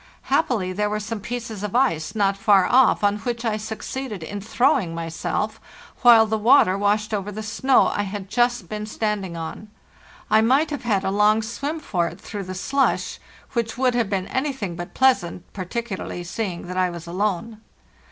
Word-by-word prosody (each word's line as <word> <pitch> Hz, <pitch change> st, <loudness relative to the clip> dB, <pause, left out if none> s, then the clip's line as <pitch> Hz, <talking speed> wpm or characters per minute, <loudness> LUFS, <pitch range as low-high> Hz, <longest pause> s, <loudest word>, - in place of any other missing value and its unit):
Happily 215 Hz, -12 st, +1 dB
there 210 Hz, +2 st, 0 dB
were 210 Hz, 0 st, -1 dB
some 220 Hz, +1 st, -4 dB
pieces 225 Hz, -1 st, -5 dB
of 210 Hz, +1 st, -4 dB
ice 230 Hz, -, +1 dB
not 200 Hz, -2 st, +2 dB
far 200 Hz, -2 st, +4 dB
off 255 Hz, -3 st, +4 dB
on 205 Hz, +1 st, +2 dB
which 240 Hz, 0 st, -3 dB
I 215 Hz, -2 st, 0 dB
succeeded 220 Hz, -1 st, -5 dB
in 200 Hz, +5 st, -6 dB
throwing 225 Hz, -, +1 dB
myself, 165 Hz, 0 st, -3 dB, 0.4 s
while 235 Hz, -3 st, +8 dB
the 220 Hz, 0 st, -1 dB
water 220 Hz, -4 st, +5 dB
washed 205 Hz, +2 st, 0 dB
over 205 Hz, 0 st, -2 dB
the 215 Hz, +2 st, -6 dB
snow 255 Hz, +5 st, +3 dB
I -, -, +1 dB
had 200 Hz, -1 st, -5 dB
just 240 Hz, -2 st, +1 dB
been 210 Hz, +3 st, -5 dB
standing 210 Hz, -5 st, -2 dB
on. 165 Hz, +6 st, -6 dB, 0.6 s
I 215 Hz, -, +4 dB
might 275 Hz, +7 st, +3 dB
have 285 Hz, -4 st, -5 dB
had 200 Hz, -4 st, +1 dB
a 190 Hz, -, 0 dB
long 210 Hz, +2 st, +3 dB
swim 280 Hz, +8 st, -4 dB
for 180 Hz, -, -1 dB
it 170 Hz, +3 st, -9 dB
through 205 Hz, -2 st, -6 dB
the 185 Hz, +1 st, -6 dB
slush, 270 Hz, +8 st, 0 dB, 0.3 s
which 230 Hz, -2 st, -2 dB
would 255 Hz, -1 st, +2 dB
have 235 Hz, -4 st, 0 dB
been 190 Hz, -2 st, -1 dB
anything 260 Hz, -, -2 dB
but 175 Hz, +1 st, -8 dB
pleasant, 180 Hz, -10 st, +2 dB
particularly 195 Hz, -2 st, -4 dB
seeing 175 Hz, -1 st, -4 dB
that 180 Hz, +1 st, -6 dB
I 185 Hz, -1 st, +2 dB
was 170 Hz, 0 st, -8 dB
alone. 210 Hz, +4 st, -2 dB
210 Hz, 180 wpm, -23 LUFS, 190-240 Hz, 0.6 s, while